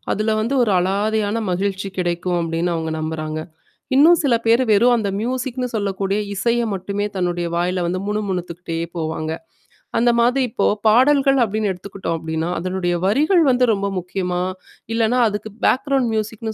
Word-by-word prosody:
அதுல 215 +1 0
வந்து 235 +5 -1
ஒரு 215 - -1
அலாதையான 205 +3 0 0.2
மகிழ்ச்சி 195 +1 -2
கிடைக்கும் 175 0 -1
அப்டின்னு 165 +1 -1
அவங்க 160 -1 -3
நம்புறாங்க. 155 0 -3 0.5
இன்னும் 325 +5 +6
சில 275 -5 +3
பேரு 230 +3 +4
வெறும் 235 +4 +5
அந்த 215 -4 0
மியூசிக்னு 250 +2 -2
சொல்லக்கூடிய 200 -2 -1 0.2
இசைய 235 +4 +1
மட்டுமே 200 +2 -3
தன்னுடைய 175 -1 -1
வாயில 180 +1 0
வந்து 180 +2 -1
முணு 210 +1 -1
முணுத்துக்கிட்டே 175 -2 -4 0.2
போவாங்க. 160 -1 -3 0.7
அந்த 240 +1 +4
மாதிரி 250 +3 +3
இப்போ - - 0 0.2
பாடல்கள் 270 +4 +4
அப்டின்னு 215 -1 -1
எடுத்துக்கிட்டோம் 190 -2 -5
அப்டின்னா, 160 +1 -3
அதனுடைய 180 0 -1
வரிகள் 305 - +3
வந்து 250 0 +3
ரொம்ப 200 -1 -1
முக்கியமா? 180 0 -3 0.5
இல்லன்னா 230 +2 +2
அதுக்கு 210 0 -4
பேக்ரவுண்ட் 270 -2 +2
மியூசிக்னு 220 +1 -3
200 Hz, 145 wpm, -20 LUFS, 180-235 Hz, 0.7 s, இன்னும்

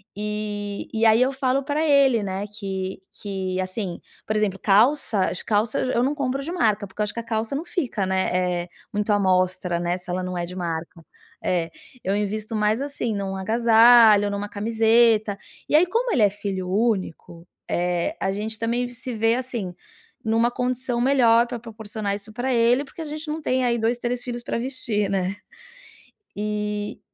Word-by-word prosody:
e 210 -1 -4
e 225 +1 +1
aí 220 +2 +6
eu 260 +2 +3
falo 265 0 0
para 290 +3 -1
ele, 275 -6 +4
né, 195 +1 -3
que 190 -2 -5 0.2
que 190 -3 -3
assim, 185 -1 -4 0.3
por 215 - -2
exemplo 210 -3 +1
calça, 215 -1 +3
as 180 - -4
calças 215 +3 0
eu 240 - +1
não 280 +3 0
compro 270 -1 -1
de 330 - -5
marca, 215 - +1
porque 190 - -6
eu - - +4
acho 210 - -3
que - - -4
a - - -5
calça 220 +5 -2
não 315 - -3
fica, 250 - -2
né, 190 0 0 0.4
eh, - - -22 0.2
muito 210 +1 0
à 205 - +3
mostra, 185 -2 +1
né, 175 +1 -1
se 180 0 -11
ela 180 +1 -2
não 180 0 -4
é 175 - -2
de 180 +1 -8
marca. 165 -1 -5 0.4
É, 170 -2 0 0.3
eu 195 +2 0
invisto 215 +2 -2
mais 215 +4 +1
assim 280 -6 -3
num 195 -1 -3
agasalho, 225 0 +6
numa 205 0 -3
camiseta, 220 -1 +3 0.3
e - - +3
aí 320 +4 +6
como 465 +4 0
ele 225 - +3
é 205 - +6
filho 195 -3 -4
único, 190 -5 -1 0.2
eh. 175 - 0
A 195 - 0
gente 215 +2 -4
também 240 +2 0
se 245 +1 -6
vê 225 +1 +2
assim 240 -8 -4 0.5
numa 225 +2 +2
condição 250 0 -2
melhor 240 -3 +5
pra 240 0 -5
proporcionar 215 -2 -4
isso 210 +1 -10
para 245 +3 -2
ele, 240 +3 +3
porque 305 - -10
a 320 - -4
gente 305 +1 -6
não 305 +1 -3
tem 260 -3 +1
aí 235 -1 +2
2, 230 +2 +1
3 245 0 -2
filhos 240 -1 -5
para - - -2
vestir, 235 -5 -1
né. 190 0 -1 1.0
E 210 0 -3
215 Hz, 190 wpm, -23 LUFS, 195-245 Hz, 1.0 s, aí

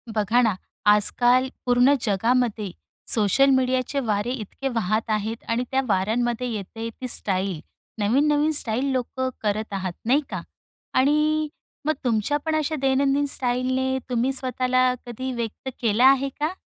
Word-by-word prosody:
बघा 220 +4 +2
ना, 220 -6 +2 0.3
आजकाल 245 +5 +4 0.2
पूर्ण 245 +3 +4
जगामध्ये 225 -1 0 0.4
सोशल 225 +6 +4
मीडियाचे 260 +1 +1
वारे 210 +3 0
इतके 255 +2 -5
वाहत 220 -1 -1
आहेत 215 +2 -2
आणि 230 +2 0
त्या 265 0 +2
वाऱ्यांमध्ये 230 +5 0
येते 225 +2 -5
ती 255 +3 -7
स्टाईल. 190 -6 0 0.4
नवीन-नवीन 290 +8 +2
स्टाईल 235 +2 +1
लोकं 260 0 -2
करत 215 0 -2
आहात, 190 -2 -3
नाही 265 +6 +3
का? - - -4 0.5
आणि 300 +3 +2 0.4
मग 310 - +2
तुमच्या 235 +3 +1
पण 315 -1 0
अशा 310 0 -1
दैनंदिन 275 +1 +2
स्टाईलने 260 +1 0
तुम्ही 250 +1 +1
स्वतःला 255 -1 +1
कधी 255 +2 -5
व्यक्त 235 +2 -5
केलं 230 0 +2
आहे 270 +1 +5
का? 305 +4 -1
245 Hz, 135 wpm, -24 LUFS, 220-265 Hz, 0.5 s, आहे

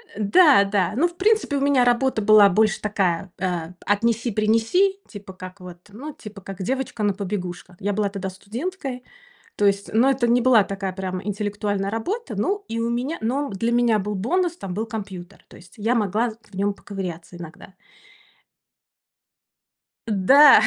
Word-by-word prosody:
Э, - - -8
да 275 - +6
да, 195 -2 0
ну, 330 +7 +3
в 345 - -12
принципе, 420 -7 +2
у - - -2
меня 275 -3 +3
работа 245 -1 +2
была 205 -1 +7
больше 215 +3 +2
такая, 190 -3 -1
а, 175 -3 -2
п - - -31 0.2
отнеси-принеси, 230 - +1
типа 200 -3 -10
как 185 +1 -10
вот, 180 -1 -10
ну, 275 +9 -8
типа 210 -3 -11
как 195 0 -8
девочка 255 -1 -3
на 205 -1 +2
побегушках. 185 -2 -5
Я 205 +1 -1
была 205 0 0
тогда 195 -1 -5
студенткой, 250 - -6 0.5
то 205 - +2
есть, 200 0 0
но 245 +5 +4
это 255 -2 +1
не 245 +1 +4
была 240 -4 +5
такая 195 -1 -4
прям 185 -1 -4
интеллектуальная 205 -1 -2
работа, 385 - -3
ну, 405 +1 -1
и 230 - -3
у 230 +1 -1
меня 255 +7 -2
но 270 +6 -1
б - - -7
для 230 +4 0
меня 235 -2 +3
был 210 +1 -3
бонус: 340 - 0
там 185 - -6
был 220 +2 -2
компьютер, 200 -4 -8
то - - -15
есть 175 +1 -17
я 225 +4 0
могла 225 +2 0
з 215 - -12 0.2
в - - -12
нём 200 +1 0
поковыряться 180 -5 -7
иногда. 175 +2 -11 2.3
Да 265 +9 +7
210 Hz, 175 wpm, -23 LUFS, 195-245 Hz, 2.3 s, была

